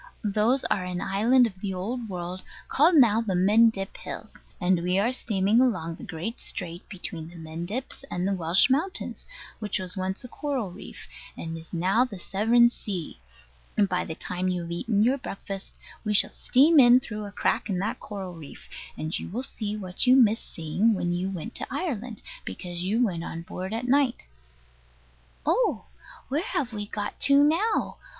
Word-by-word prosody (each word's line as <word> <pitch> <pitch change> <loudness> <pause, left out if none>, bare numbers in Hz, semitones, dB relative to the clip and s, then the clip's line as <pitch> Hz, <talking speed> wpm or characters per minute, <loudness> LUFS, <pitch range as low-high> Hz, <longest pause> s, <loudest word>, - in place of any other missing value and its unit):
Those 215 +5 +2
are 185 - +1
an 180 -1 -3
island 230 +8 +4
of 190 -5 -5
the 195 -1 -3
Old 225 +5 -4
World, 180 0 -5 0.2
called 320 +5 +4
now 230 -6 +6
the 200 -5 -1
Mendip 200 +1 +3
Hills; - - -8 0.2
and 180 -2 +2
we 180 +2 +1
are 225 +6 +2
steaming 210 -1 +2
along 170 -10 +1
the - - -11
great 175 +8 -5
strait 175 -1 -5
between 170 -4 -5
the 175 - -14
Mendips 170 +12 -5
and 180 +1 -1
the 200 - +1
Welsh 180 +5 +4
mountains, 315 +9 -1 0.3
which 210 -2 -1 0.2
once 190 +2 -3
was 250 - -10
coral 270 -10 -2
reef, 185 - -10 0.3
and 165 0 -5
is 165 0 -10
now 190 +7 +3
the 250 -6 -5
Severn 225 +6 +4
sea; 185 - -5 0.6
and 205 -2 +4
by 180 -1 0
the 160 - -6
time 180 +2 -3
you 180 -1 0
have 170 - -7
eaten 205 +4 +1
your 260 +4 +2
breakfast 195 -4 -7 0.3
we 210 -1 0
shall - - +4
steam 295 +5 +5
in 245 -1 +8
through 215 -4 -6
a 200 - -7
crack 205 - 0
in 190 - 0
that 195 +3 -2
coral 195 -3 -6
reef; 160 -4 -11 0.3
and 155 +1 -2
you - - -7
will 235 +8 -3
see 215 -5 -2
what 185 +4 -1
you 255 - +8
missed 230 -4 +3
seeing 185 +8 +1
when 175 -2 -1
you 180 +2 -1
went 195 +5 -6
to - - -4
Ireland, 250 - -3 0.2
because 175 -1 -5
you 220 +6 +2
went 170 -6 -3
on 165 -1 -6
board 185 +1 -6
at 230 +3 -3
night. 270 -1 +2 1.2
Oh! - - +2 0.4
Where 290 +4 0
have 275 - -2
we 205 -1 -4
got 205 0 -4
to 280 +1 +6
now? 355 +9 +1
205 Hz, 185 wpm, -26 LUFS, 180-240 Hz, 1.2 s, in